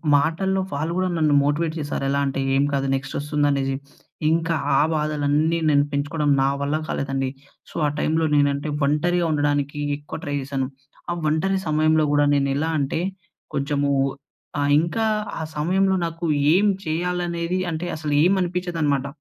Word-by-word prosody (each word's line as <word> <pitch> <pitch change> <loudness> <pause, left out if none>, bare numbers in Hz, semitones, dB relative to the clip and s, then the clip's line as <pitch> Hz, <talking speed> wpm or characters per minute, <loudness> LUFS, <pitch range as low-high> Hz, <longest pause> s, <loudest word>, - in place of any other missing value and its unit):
మాటల్లో 190 +6 +1
వాళ్ళు 155 +4 -2
గూడా 185 0 +1
నన్ను 155 -2 +3
మోటివేట్ 155 +3 0
చేశారు. 145 -2 -3
ఎలా 140 0 +1
అంటే, 135 0 -2
ఏం 140 - +3
కాదు, 135 0 0
నెక్స్టొస్తుందనేసి. 140 0 -1 0.6
ఇంక 165 0 +1 0.3
ఆ - - +5
బాధలన్నీ 150 +1 +1
నేను 145 0 +4
పెంచుకోడం 145 +1 -1
నా 135 - +3
వల్ల 145 +2 0
కాలేదండి. 135 -1 -1 0.4
సో, - - -18
ఆ - - +1
టైమ్‌లో 160 +1 +1
నేనంటే, 145 +1 +2 0.2
ఒంటరిగా 175 +4 +1
ఉండడానికీ 145 -1 0 0.2
ఎక్కువ 145 - -8
ట్రై 145 0 -2
చేశాను. 135 -1 -2 0.4
ఆ - - +1 0.2
ఒంటరి 190 +5 +1
సమయంలో 155 0 +3
గూడా 145 0 +4
నేనెలా 140 +3 0
అంటే, 140 +4 -1 0.5
కొంచెము 140 0 0 0.7
ఆహ్, 145 0 +1
ఇంకా 220 +8 0 0.3
ఆ - - -3 0.2
సమయంలో 190 +5 +2
నాకు 165 +1 -4 0.3
ఏం 205 +3 +4 0.2
చెయ్యాలనేది 175 +1 -1
అంటే, 175 +3 -3
అసలు 150 -2 -1
ఏమనిపిచ్చదనమాట. 175 -6 +1
150 Hz, 140 wpm, -23 LUFS, 145-170 Hz, 0.7 s, ఆ